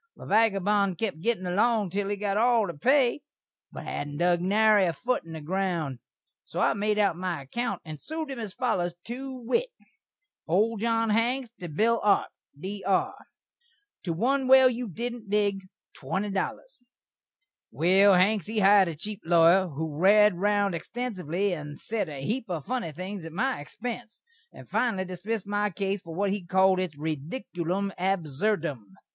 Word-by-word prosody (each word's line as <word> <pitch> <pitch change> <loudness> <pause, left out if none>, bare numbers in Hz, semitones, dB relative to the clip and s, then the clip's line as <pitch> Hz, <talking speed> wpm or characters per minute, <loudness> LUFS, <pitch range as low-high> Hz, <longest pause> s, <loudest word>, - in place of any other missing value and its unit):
The - - -12
vagabon 200 -2 +2
kep 190 -2 -3
gittin' 210 0 -1
along 210 +1 +1
til 200 +1 -1
he 205 - 0
got 200 -1 -2
all 230 0 +3
the 170 - -5
pay, 260 - +2 0.5
but - - -8
hadn't 145 0 -5
dug 175 +1 +2
nary 210 +1 +4
a 170 - 0
foot 250 +8 -1
in 165 0 -10
the 160 - -6
ground. 170 -5 -2 0.4
So - - -6
I - - +3
made 210 +1 0
out 200 -5 +2
my 175 -5 -4
akkount, 200 - -3
and 155 -2 -8
sued 315 -2 -5
him 265 - -6
as 210 -4 -6
follers, 185 -9 -1
to 260 +3 -6
wit: 260 - -1 0.8
Old 210 +6 +2
John 225 -1 +1
Hanks, 240 +3 0
to 175 - -6
Bill 225 +9 +2
Arp 205 -1 +2 0.3
Dr. 195 +2 -1 0.9
To 170 - -1
1 260 +9 +1
well 260 -1 +7
you 245 -1 -4
didn't 235 +2 -6
dig 200 -2 0 0.3
$20 205 - -3 0.9
Well, 190 +3 +5
Hanks, 190 0 +2
he 220 +1 -4
hired 200 -1 +6
a 165 - -4
cheep 205 +6 -6
lawyer, 170 +3 +5
who 155 -1 -5
rared 210 +3 +6
round 200 +1 +1
xtensively, 190 -1 -3
and 150 -2 -8
sed 215 -6 -3
a 140 -2 -6
heep 230 - -2
of 165 -5 -4
funny 250 -9 -2
things 185 +4 -6
at 165 -1 -8
my 250 - -1
xpense, 235 +6 -7 0.3
and - - -13
finally 195 -7 0
dismissd 185 +4 -4
my 205 +1 0
case 195 +1 -2
for 165 -2 -9
what 200 +2 0
he 200 -1 -3
calld 190 +1 +3
its 175 -6 -3
"ridikulum 170 - -3
abserdum." 175 - -1
200 Hz, 165 wpm, -27 LUFS, 175-225 Hz, 0.9 s, well